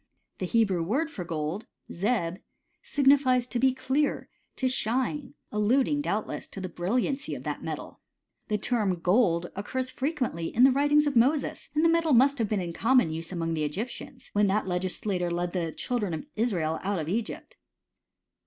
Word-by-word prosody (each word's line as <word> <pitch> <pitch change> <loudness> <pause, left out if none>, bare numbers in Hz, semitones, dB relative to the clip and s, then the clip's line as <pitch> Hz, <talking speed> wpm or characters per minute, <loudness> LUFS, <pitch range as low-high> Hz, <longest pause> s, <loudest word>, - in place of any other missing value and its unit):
The 185 - -2
Hebrew 200 -5 +2
word 275 - 0
for 195 - -5
gold, 165 +4 -3 0.2
^"Tt 195 -3 0
{zeb) - - -20 0.4
signifies 270 -3 +3
to 245 -1 -3
be 265 +1 +4
clear, 265 +3 -1 0.3
to 260 - 0
shine; 260 +3 -1 0.2
alluding, 255 +7 +2
doubtless, 215 -6 -2
to - - -9
the 185 - -4
brilliancy 245 - -1
of - - -8
that - - -4
metal. - - -6 0.5
The 210 - 0
term 210 -4 0
ffold 175 -2 +2
occurs 255 +6 -3
frequently 260 - -2
in 240 - +2
the 265 - +8
writings 290 +3 +4
of 290 -2 0
Moses, 270 +5 +2
and 310 +2 +3
the - - +7
metal 330 -2 +3
must 270 +3 +5
have 220 -3 0
oeen 205 -4 0
in 170 -1 -5
common 245 -4 +3
use 165 +2 -5
among 165 -2 -2
the 155 -1 -1
Egyptians, 235 - -5
when 205 0 +3
that 205 +2 +1
legislator 180 0 -1
led 175 0 -2
the 170 -3 -1
children 210 -4 -2
of 160 - -6
Israel 175 -9 0
out 200 +1 -1
of 155 -2 -3
Egypt. 215 +6 -4
220 Hz, 175 wpm, -28 LUFS, 180-265 Hz, 0.5 s, the